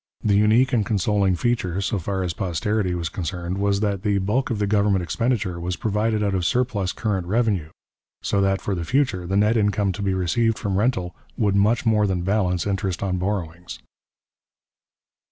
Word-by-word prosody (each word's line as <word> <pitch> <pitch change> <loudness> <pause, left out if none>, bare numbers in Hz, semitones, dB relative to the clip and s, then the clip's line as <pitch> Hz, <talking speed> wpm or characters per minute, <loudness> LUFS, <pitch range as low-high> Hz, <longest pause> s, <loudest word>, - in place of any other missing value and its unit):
The 105 - +2
unique 110 +6 +4
and 115 -3 +3
consoling 100 -2 +1
feature, 95 -5 -1
so 100 +1 -1
far 95 +2 -2
as 85 -2 -2
posterity 95 0 -1
was 85 -1 -2
concerned, 90 +2 -4
was 100 0 +1
that 100 -3 -1
the 105 -1 +1
bulk 115 +9 0
of 115 - -1
the 105 - 0
government 100 -2 +2
expenditure 105 -3 -1
was 90 +1 -3
provided 105 +2 0
out 100 -1 0
of 95 -2 0
surplus 115 -4 0
current 100 -6 -2
revenue, 105 -6 0 0.5
so 100 - +1
that 95 0 +1
for 100 - -1
the 85 -2 -3
future 100 - 0
the 95 +2 0
net 105 +3 +3
income 105 -2 +1
to 95 - -6
be 95 -2 0
received 110 +5 +1
from 100 -3 -2
rental 105 -7 0 0.2
would 105 -3 +1
much 110 +5 +2
more 105 -2 +3
than 90 -2 -1
balance 90 -3 0
interest 95 -2 -2
on 90 -2 -1
borrowings. 90 -3 -4
100 Hz, 185 wpm, -23 LUFS, 90-110 Hz, 0.5 s, unique